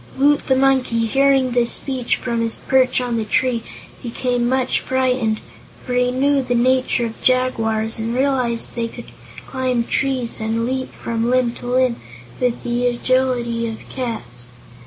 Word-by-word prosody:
Woot 285 +2 +3
the 265 - +3
Monkey, 260 -4 +2
hearing 270 +1 +3
this 240 -1 +3
speech 260 -3 0
from 235 -2 -2
his 230 0 +1
perch 260 -1 +2
on 245 -2 -2
the 225 - -1
tree, 240 +2 0 0.4
became 245 0 -1
much 260 -1 +1
frightened, 250 -4 0 0.5
for 250 - -3
he 250 0 +2
knew 275 +2 +2
the 250 -1 -1
nature 255 0 +2
of 225 -1 -7
jaguars 225 -4 +2
and 230 +2 -2
realized 255 -3 0
they 235 -1 -2
could - - -11 0.3
climb 255 -3 -1
trees 255 -3 -1
and 225 +1 -1
leap 260 +1 -3
from 230 0 -3
limb 250 -1 +2
to 245 - -9
limb 250 -1 +2 0.4
with 250 -2 -1
the 245 +1 0
agility 240 -1 0
of 220 - -9
cats. 220 - -6
250 Hz, 155 wpm, -20 LUFS, 230-260 Hz, 0.5 s, Woot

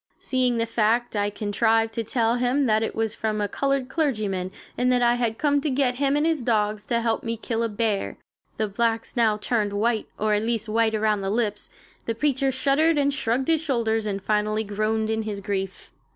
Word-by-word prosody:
Seeing 255 -2 0
the 230 - +1
fact, 230 +1 +1
I 205 0 +1
contrived 225 +2 +1
to 230 - -2
tell 230 +1 +1
him 250 +3 +1
that 215 -2 +2
it 225 - -2
was 225 -1 -1
from 215 -1 -2
a 205 - 0
colored 275 +2 -1
clergyman, 215 - -1 0.2
and 250 +1 +2
that 245 -1 +3
I 240 0 +4
had 235 -2 -1
come 285 -1 +2
to 305 - -1
get 255 -2 +1
him 280 0 +2
and 295 +1 +2
his 320 -4 +1
dogs 215 -3 0
to 235 -1 +1
help 225 -1 0
me 230 -1 -3
kill 225 +1 -2
a 230 - 0
bear. 210 -1 -1 0.4
The 215 - 0
blacks 225 +3 -1
now 225 -3 +3
turned 210 -2 -1
white; 220 +2 0
or 215 0 +1
at 210 - +2
least 230 0 -1
white 220 0 +1
around 215 -1 +1
the 195 - -2
lips. 210 -1 -1 0.4
The 230 - -1
preacher 270 +1 +1
shuddered 285 +5 +2
and 285 0 +2
shrugged 260 -1 -1
his 320 -2 +2
shoulders 225 -7 0
and 195 -1 -3
finally 215 +1 0
groaned 215 +1 -1
in 220 0 0
his 215 -2 -4
grief. 195 -1 -4
225 Hz, 210 wpm, -24 LUFS, 215-250 Hz, 0.4 s, I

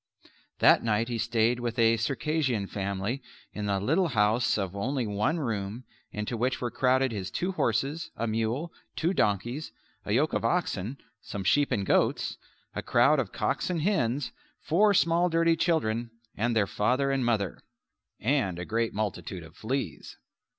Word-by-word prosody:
That - - +6
night 115 +1 +1
he 120 -1 -2
stayed 120 +1 +2
with 120 -1 -3
a 115 -1 +5
Circassian 135 -1 0
family 100 +6 -3 0.3
in 105 -1 -3
a 100 -1 +1
little 160 - +2
house 110 -2 +2
of 95 -2 -3
only 125 +5 -1
one 105 +10 0
room 110 -3 -3 0.3
into 105 +3 -3
which 125 +3 0
were 120 -2 -2
crowded 130 +1 +2
his 100 -3 -4
two 180 - -2
horses, 140 - -1
a 115 - -2
mule, 115 +8 -1 0.2
two 170 +4 +1
donkeys, 120 - 0 0.3
a - - -4
yoke 145 +7 +2
of - - 0
oxen, 135 - -1 0.2
some 100 - -5
sheep 145 +9 +3
and 100 -6 0
goats, - - +1 0.3
a - - -3
crowd - - +4
of - - -2
cocks - - -1
and 170 -4 -1
hens, 140 - 0 0.3
four 205 +5 +3
small 170 +1 +3
dirty 165 0 +3
children 120 -9 0 0.3
and 115 +2 0
their 105 -2 +3
father 130 +8 +1
and 135 -1 +1
mother; 110 -6 0 0.6
and 115 -7 +1
a 90 - -4
great 115 +1 -1
multitude 95 -4 -3
of 80 +1 -14
fleas. 130 +7 -4
120 Hz, 165 wpm, -28 LUFS, 105-145 Hz, 0.6 s, That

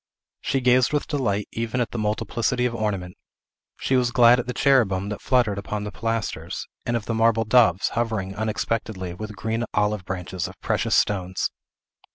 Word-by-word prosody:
She 135 - -1
gazed 125 0 +4
with 150 - +1
delight 105 -8 -1
even 115 +2 -2
at 120 - -1
the 120 - -4
multiplicity 115 +3 0
of 125 - 0
ornament. 100 -6 -2 0.6
She 130 - +1
was 125 -2 +3
glad 120 0 +6
at 125 - -4
the - - -1
cherubim 105 -10 +2
that 105 - -5
fluttered 120 -6 +2
upon 105 +1 -4
the 105 - -5
pilasters, 110 -7 -3 0.2
and 120 0 +1
of 110 - -6
the 115 - -2
marble 115 0 +3
doves, 110 -6 +4
hovering 110 -5 -2
unexpectedly, 110 -3 -2
with 110 +3 -7
green 110 +4 -2
olive 105 -1 +1
branches 95 -1 -4
of - - -13
precious - - 0
stones. 95 -2 0
110 Hz, 175 wpm, -24 LUFS, 100-120 Hz, 0.6 s, glad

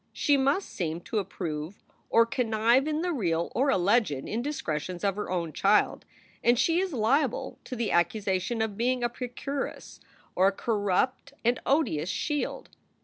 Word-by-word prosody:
She 290 - +3
must 280 +8 +1
seem 170 -2 -3
to 215 - -2
approve 170 -3 -5 0.3
or 230 0 +5
connive 230 +3 +2
in 310 0 0
the 355 -1 0
real 170 - -1
or 270 +3 +2
alleged 205 +2 +3 0.2
indiscretions 185 - -3
of 200 -2 +1
her 210 - -4
own 170 -4 -2
child, 205 +2 +2 0.4
and 240 +1 +4
she 330 +7 +3
is 380 -1 -1
liable 265 +2 0
to 255 - -5
the 230 -2 -1
accusation 195 +5 +1
of 210 -3 -4
being 245 +1 +1
a 240 - +2
procuress 255 +3 -5 0.3
or 185 +1 +4
a - - +4
corrupt 220 +7 0
and 240 +1 +3
odious 185 - +1
shield. 295 - -2
225 Hz, 155 wpm, -28 LUFS, 185-265 Hz, 0.4 s, or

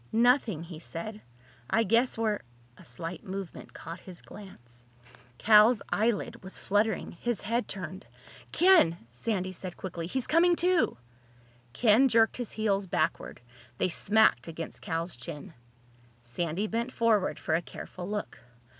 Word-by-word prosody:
"Nothing," 230 - +3
he 165 -2 -9
said. 205 +6 -7 0.5
"I 225 - +3
guess 230 +5 +2
we're—" 220 -2 0 0.4
A - - -16
slight 165 +9 -6
movement 195 -1 -7
caught 170 +1 -8
his 180 -1 -12
glance. 120 - -13 0.5
Cal's 215 - +6
eyelid 220 0 0
was 190 - -9
fluttering. 205 0 0
His 235 +5 -3
head 230 +4 -1
turned. 185 -1 -7 0.4
"Ken!" 350 - +5
Sandy 185 - -2
said 185 -1 -8
quickly. 170 -3 -5
"He's 260 +6 -2
coming 345 +2 +4
to!" 355 - +2 0.8
Ken 235 - +5
jerked 225 -2 +3
his 245 -3 -4
heels 200 -3 0
backward. 165 -5 -1 0.4
They 185 - +1
smacked 205 - +3
against 165 0 -7
Cal's 165 +1 -3
chin. 145 +8 -8 0.7
Sandy 165 - -2
bent 230 +3 -2
forward 225 -6 +2
for 160 - -2
a 165 - +2
careful 180 +1 -8
look. 210 0 -4
200 Hz, 135 wpm, -29 LUFS, 170-230 Hz, 0.8 s, Cal's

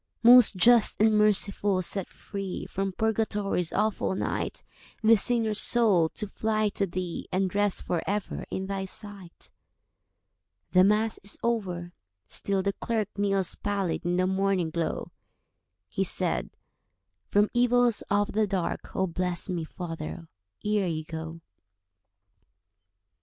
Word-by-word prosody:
"Most 245 -2 +8
Just 235 +4 +5
and 215 0 +4
Merciful, 205 -2 +3
set 195 +1 -2
free 195 -2 -6
From 195 0 -3
Purgatory's 210 -4 -1
awful 210 -2 0
night - - -3 0.4
This 220 -2 +5
sinner's 225 -3 +1
soul, 205 -9 +3
to 210 - -3
fly 215 +1 -1
to 200 0 -1
Thee, 175 -1 -5
And 185 -1 0
rest 205 -1 0
for 170 -2 -1
ever 205 0 -3
in 190 - -4
Thy 195 0 -3
sight." 195 -3 -5 1.2
The 185 0 +5
Mass 210 +3 +2
is 200 - -5
over—still 175 - -3
the 200 0 0
clerk 220 -2 -2
Kneels 195 -2 0
pallid 200 -4 -2
in 175 +1 0
the 185 0 +2
morning 190 -3 0
glow. 165 -1 -3 0.8
He - - -2
said, - - 0 0.8
"From 205 +1 +2
evils 245 -1 +3
of 205 0 +1
the 215 0 +1
dark 190 -3 -3
Oh, 190 - +1
bless 180 +1 -2
me, 170 -2 -2
father, 165 0 -7 0.4
ere 210 -2 +1
you 155 -2 -3
go. 160 +1 -7
195 Hz, 130 wpm, -27 LUFS, 180-210 Hz, 1.2 s, Most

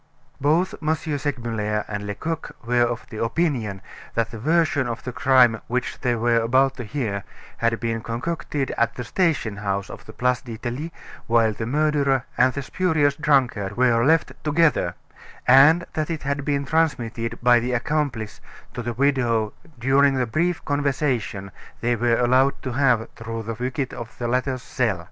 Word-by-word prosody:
Both 160 +6 +2
M. 155 0 +1
Segmuller 120 -9 -2
and 105 -1 -4
Lecoq 160 +11 -4
were 120 +1 +2
of 120 0 0
opinion 115 - -1 0.3
that 115 -1 0
the 115 - -7
version 155 -1 +2
of 120 +1 -5
the 125 - -4
crime 125 -3 +4
which 125 +1 -2
they 125 -2 +1
were 115 +1 +2
about 130 +4 +2
to 125 - -4
hear 105 -5 -3 0.3
had 115 0 0
been 115 -1 -2
concocted 135 +4 -3
at 115 0 +1
the 125 - -4
station 130 - 0
house 100 -1 -2
of - - -11
the - - -10
Place 125 0 +1
d'Italie 125 +6 -5 0.4
while 115 -1 +3
the 110 +1 -4
murderer 140 -2 +1
and 130 +1 +4
the 140 - -4
spurious 155 -3 +1
drunkard 125 -9 +1
were 120 -2 +3
left 160 +4 +3
together, 155 +1 +2 0.5
and 145 +7 +7
that 155 0 -2
it 160 -2 -3
had 140 0 -2
been 140 -1 -1
transmitted 120 -7 -1
by 120 -1 +6
the 125 +2 -2
accomplice 120 -4 -2 0.3
to 125 - -4
the 120 0 -3
widow 120 -4 +1 0.2
during 135 +3 +3
the 130 -1 +1
brief 170 +9 -1
conversation 135 -9 -1 0.3
they 120 +1 +1
were 120 0 +2
allowed 130 +3 +3
to 130 - -3
have 120 -3 +2
through 115 0 -5
the 115 +1 -4
wicket 125 +3 -3
of 115 -1 -8
the 120 - -2
latter's 130 +1 -1
cell. 115 -8 -1
125 Hz, 165 wpm, -23 LUFS, 115-145 Hz, 0.5 s, and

